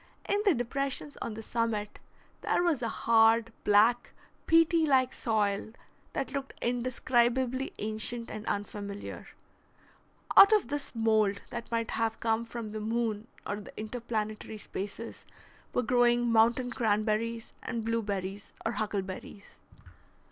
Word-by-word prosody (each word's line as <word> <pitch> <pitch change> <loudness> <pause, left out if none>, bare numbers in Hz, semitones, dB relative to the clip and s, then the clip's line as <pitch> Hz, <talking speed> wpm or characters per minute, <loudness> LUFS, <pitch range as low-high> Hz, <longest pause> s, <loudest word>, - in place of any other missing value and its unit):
In 405 +1 +1
the 390 -6 +5
depressions 275 +4 -3
on 220 - -4
the 220 - -7
summit 220 -3 -2 0.4
there - - +1
was 330 -7 +1
a 230 - -1
hard, 225 0 +4
black, 220 +4 +4 0.3
peaty 330 0 +5
like 260 -2 +3
soil 215 -2 0 0.4
that 270 - -2
looked 275 -1 -4
indescribably 250 +1 +1
ancient 220 +2 -1
and 215 -1 -6
unfamiliar. 205 0 -5 1.1
Out 400 - +10
of 425 - +3
this 290 -3 -4
mould, 215 -3 +2
that 235 -1 -6
might 230 -1 -1
have 225 0 -1
come 225 0 0
from 230 -2 -6
the 215 - -4
moon 225 -1 -1 0.2
or 205 - -2
the 205 - -11
interplanetary 215 -1 -4
spaces, 210 +2 -7 0.4
were 250 - 0
growing 240 0 +3
mountain 235 +3 +3
cranberries 220 +1 0
and 230 -3 -4
blueberries 200 -3 -3
or 225 - +1
huckleberries. 200 -2 -5
230 Hz, 125 wpm, -30 LUFS, 215-245 Hz, 1.1 s, Out